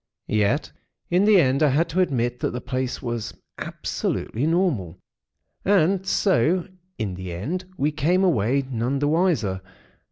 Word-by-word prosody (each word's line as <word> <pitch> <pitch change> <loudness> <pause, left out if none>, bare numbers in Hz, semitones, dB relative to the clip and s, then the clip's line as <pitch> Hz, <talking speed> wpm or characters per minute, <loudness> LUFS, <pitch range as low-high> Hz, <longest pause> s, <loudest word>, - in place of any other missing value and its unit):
Yet, 110 +7 +1 0.4
in 180 +3 +4
the 210 -2 +6
end, 135 -2 +2
I 155 - +5
had 155 +6 +2
to 170 +4 -1
admit 125 -8 0
that - - 0
the 125 - -3
place 130 0 -2
itself - - -13
was 115 -3 -3 0.3
absolutely 125 +7 -2
normal; 155 - 0 0.7
and 190 0 +2
so 180 - +2 0.3
in 105 -5 -3
the 95 0 -6
end 150 - -4
we 150 +2 +1
came 175 +5 +1
away 135 - +2
none 125 +3 -1
the 145 +1 0
wiser. 150 - +1
140 Hz, 155 wpm, -24 LUFS, 115-175 Hz, 0.7 s, the